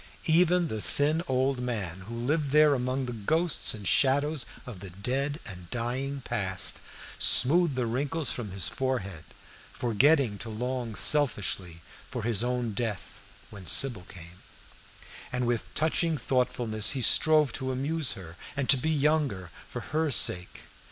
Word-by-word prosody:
Even 175 Hz, +1 st, +3 dB
the 110 Hz, -5 st, -4 dB
thin 150 Hz, +8 st, 0 dB
old 130 Hz, 0 st, 0 dB
man, 105 Hz, -8 st, -4 dB
who 115 Hz, -, -7 dB
lived 140 Hz, +5 st, -1 dB
there 150 Hz, +1 st, +5 dB
among 130 Hz, 0 st, -1 dB
the 125 Hz, -, -5 dB
ghosts 115 Hz, -, +1 dB
and 105 Hz, -3 st, -7 dB
shadows 145 Hz, 0 st, +2 dB, 0.2 s
of 115 Hz, -7 st, -9 dB
the 95 Hz, 0 st, -8 dB
dead 135 Hz, -, -2 dB
and 90 Hz, -3 st, -9 dB
dying 130 Hz, +5 st, -3 dB
past, 95 Hz, -7 st, -2 dB, 0.4 s
smoothed 150 Hz, +3 st, +3 dB
the 125 Hz, -2 st, -1 dB
wrinkles 140 Hz, +6 st, -2 dB
from 115 Hz, -4 st, -4 dB
his 95 Hz, -1 st, -2 dB
forehead, 105 Hz, -11 st, -3 dB, 0.5 s
forgetting 120 Hz, -1 st, +2 dB
to 115 Hz, -, -6 dB
long 120 Hz, 0 st, -4 dB
selfishly 100 Hz, -, +2 dB, 0.3 s
for -, -, -5 dB
his 115 Hz, -1 st, +1 dB
own 125 Hz, -2 st, -2 dB
death, 105 Hz, -2 st, -5 dB, 0.3 s
when 95 Hz, -3 st, -10 dB
Sybil 115 Hz, -, +4 dB
came; 90 Hz, 0 st, -12 dB, 0.9 s
and 125 Hz, 0 st, -1 dB
with 120 Hz, -1 st, -2 dB
touching 160 Hz, +1 st, +1 dB
thoughtfulness 120 Hz, -4 st, 0 dB
he 130 Hz, -, -1 dB
strove 155 Hz, 0 st, +4 dB
to 130 Hz, -1 st, -3 dB
amuse 140 Hz, +3 st, 0 dB
her, 85 Hz, -3 st, -10 dB, 0.2 s
and 140 Hz, -2 st, -1 dB
to 135 Hz, -, +7 dB
be 140 Hz, +5 st, -2 dB
younger 145 Hz, -, 0 dB, 0.2 s
for -, -, -6 dB
her 155 Hz, +1 st, -1 dB
sake. 90 Hz, -8 st, +1 dB
125 Hz, 150 wpm, -28 LUFS, 105-145 Hz, 0.9 s, to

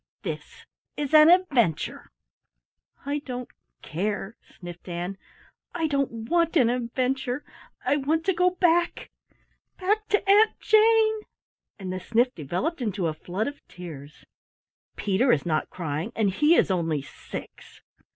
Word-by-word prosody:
This -, -, -7 dB, 0.3 s
is 295 Hz, 0 st, -3 dB
an 310 Hz, +1 st, +8 dB
adventure." 275 Hz, -, +2 dB, 1.0 s
"I 285 Hz, +1 st, -1 dB
don't 250 Hz, -3 st, -7 dB, 0.3 s
care," 205 Hz, +5 st, -3 dB, 0.2 s
sniffed 175 Hz, 0 st, -9 dB
Ann, 175 Hz, +3 st, -4 dB, 0.6 s
"I 330 Hz, -2 st, 0 dB
don't 275 Hz, -7 st, -1 dB
want 335 Hz, 0 st, +2 dB
an 240 Hz, -5 st, +4 dB
adventure. 250 Hz, +2 st, -2 dB, 0.4 s
I 285 Hz, -, +3 dB
want 310 Hz, +4 st, 0 dB
to 385 Hz, -, +2 dB
go 360 Hz, +1 st, +3 dB
back 345 Hz, -1 st, +1 dB, 0.7 s
back 420 Hz, +3 st, 0 dB
to 415 Hz, -1 st, +1 dB
Aunt 420 Hz, +3 st, +5 dB
Jane!" 440 Hz, 0 st, +4 dB, 0.6 s
And 185 Hz, -3 st, -5 dB
the 185 Hz, -, -3 dB
sniff 235 Hz, +6 st, +1 dB
developed 180 Hz, -, -3 dB
into 205 Hz, -6 st, -1 dB
a 160 Hz, -, 0 dB
flood 180 Hz, +7 st, -3 dB
of 285 Hz, 0 st, -7 dB
tears. 160 Hz, -6 st, -11 dB, 0.7 s
"Peter 205 Hz, +6 st, +2 dB
is 140 Hz, -, +1 dB
not 155 Hz, -2 st, 0 dB
crying, 165 Hz, +3 st, -4 dB
and 210 Hz, -3 st, +2 dB
he 300 Hz, -, +4 dB
is -, -, +3 dB
only 165 Hz, -6 st, 0 dB
six." -, -, -10 dB
250 Hz, 135 wpm, -26 LUFS, -, 1.0 s, an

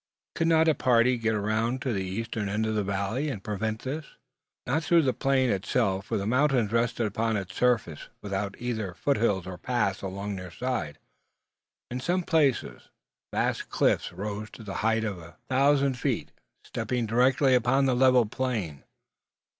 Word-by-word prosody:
Could 165 Hz, -, 0 dB
not 160 Hz, 0 st, +4 dB
a 160 Hz, -, +5 dB
party 125 Hz, -2 st, +3 dB
get 115 Hz, 0 st, 0 dB
round 110 Hz, +4 st, 0 dB
to 130 Hz, -, -1 dB
the 95 Hz, -2 st, -1 dB
eastern 105 Hz, +2 st, -3 dB
end 105 Hz, +2 st, 0 dB
of 110 Hz, -, -1 dB
the 105 Hz, -1 st, 0 dB
valley 100 Hz, +9 st, -1 dB
and 105 Hz, -8 st, -5 dB
prevent 110 Hz, +1 st, -3 dB
this? 145 Hz, +4 st, -3 dB, 0.6 s
Not 145 Hz, +6 st, +1 dB
through 170 Hz, 0 st, +4 dB
the 130 Hz, -2 st, +2 dB
plain 130 Hz, -2 st, +2 dB
itself, 95 Hz, 0 st, 0 dB
for 115 Hz, -, -1 dB
the 100 Hz, -, -2 dB
mountains 125 Hz, -2 st, +2 dB
rested 115 Hz, 0 st, +1 dB
upon 110 Hz, +1 st, 0 dB
its 95 Hz, -2 st, -5 dB
surface, 115 Hz, -11 st, 0 dB
without 100 Hz, 0 st, -3 dB
either 110 Hz, -7 st, -3 dB
foothills 105 Hz, -9 st, +1 dB
or 90 Hz, -1 st, -7 dB
paths 100 Hz, -4 st, -1 dB
along 100 Hz, +1 st, -4 dB
their 90 Hz, 0 st, -7 dB
sides. 85 Hz, -, -3 dB, 0.9 s
In 125 Hz, -, -3 dB
some 175 Hz, +7 st, 0 dB
places 150 Hz, -7 st, 0 dB, 0.4 s
vast -, -, -1 dB
cliffs -, -, +1 dB
rose 105 Hz, +1 st, -5 dB
to 115 Hz, -, -10 dB
the 100 Hz, -2 st, -5 dB
height 110 Hz, +1 st, +2 dB
of 100 Hz, -5 st, -3 dB
a 85 Hz, 0 st, -13 dB
thousand 135 Hz, 0 st, +3 dB
feet, -, -, -1 dB, 0.3 s
stepping 125 Hz, -2 st, -2 dB
directly 130 Hz, +4 st, +3 dB
upon 125 Hz, +3 st, +3 dB
the 130 Hz, -2 st, +2 dB
level 130 Hz, -1 st, +5 dB
plain. 105 Hz, -, -3 dB
115 Hz, 170 wpm, -27 LUFS, 100-130 Hz, 0.9 s, a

